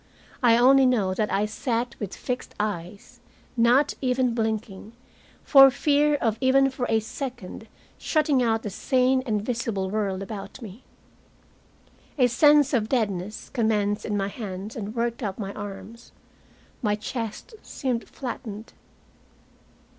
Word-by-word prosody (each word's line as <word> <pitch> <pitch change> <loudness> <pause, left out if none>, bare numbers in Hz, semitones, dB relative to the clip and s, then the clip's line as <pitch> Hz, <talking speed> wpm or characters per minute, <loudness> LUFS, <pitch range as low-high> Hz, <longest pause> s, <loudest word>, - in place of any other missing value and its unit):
I 235 -2 +5
only 265 +2 +6
know 210 -7 +1
that 210 +2 -1
I 205 +2 +1
sat 235 +2 -2
with 205 -4 -5
fixed 250 0 -5
eyes, 200 -2 -5 0.4
not 245 +4 +3
even 255 -2 +1
blinking, 220 -2 -3 0.5
for 270 -2 +8
fear 290 +2 +2
of 225 -5 -1
even 270 +1 +4
for 250 -1 -3
a 225 - +3
second 240 -2 -7 0.3
shutting 305 -4 +1
out 225 -2 +1
the 210 - -4
sane 255 +4 +2
and 210 -2 0
visible 225 -5 -2
world 200 -3 -2
about 200 +2 -8
me. 220 0 -11 1.3
A 255 - +5
sense 290 +4 +4
of 220 -4 +1
deadness 210 -5 -2
commenced 210 -2 0
in 210 -2 -2
my 195 -1 -1
hands 200 -1 -7
and 215 0 -6
worked 235 +1 -2
up 200 -4 -3
my 200 -2 -5
arms. 205 +3 -9 0.7
My 210 -4 +1
chest 225 - -6
seemed 250 -4 -4
flattened. 230 -4 -7
230 Hz, 135 wpm, -25 LUFS, 205-255 Hz, 1.3 s, for